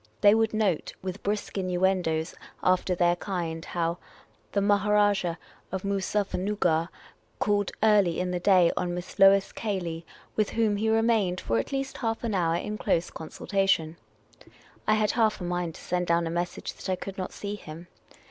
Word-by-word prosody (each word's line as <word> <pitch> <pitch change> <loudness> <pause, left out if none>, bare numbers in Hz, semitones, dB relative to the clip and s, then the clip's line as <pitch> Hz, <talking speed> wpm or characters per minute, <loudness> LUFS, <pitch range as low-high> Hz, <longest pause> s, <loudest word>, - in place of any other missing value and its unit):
Thej^ 205 +1 +8
would 225 0 +2
note, 210 -7 0
with 190 +1 -5
brisk 205 0 -2
innuendoes 180 -3 0 0.3
after 185 0 +2
their 175 0 +3
kind, 170 -4 -3
how 170 0 -2 0.3
" - - -36
the 200 - +2
Maharajah 205 -3 +2 0.3
of 190 0 -3
Moozuffernuggar 195 -3 0 0.5
called 205 - +1
early 205 -6 +4
in 180 0 -1
the 180 - -1
day 180 -2 +5
on 175 -1 -1
Miss 180 0 -8
Lois 195 0 +6
Cayley, 175 -6 -3 0.3
with 215 -1 +1
whom 220 -3 +1
he 220 +2 0
remained 220 -5 +2
for 115 0 0
at - - -4
least 270 0 -3
half 225 -2 -2
an 230 -3 -1
hour 170 -3 +1
in 210 +4 -3
close 170 - 0
consultation," 165 -1 -1 0.9
I 215 - +5
had 215 -1 +2
half 220 -2 +2
a - - -6
mind 175 -2 -2
to - - -11
send 180 0 -1
down 170 0 +2
a 165 - -3
message 175 +1 -3
that - - -8
I - - +2
could 195 +1 -7
not 185 - -3
see 205 0 -5
him. 170 -4 -9
190 Hz, 175 wpm, -27 LUFS, 175-205 Hz, 0.9 s, Thej^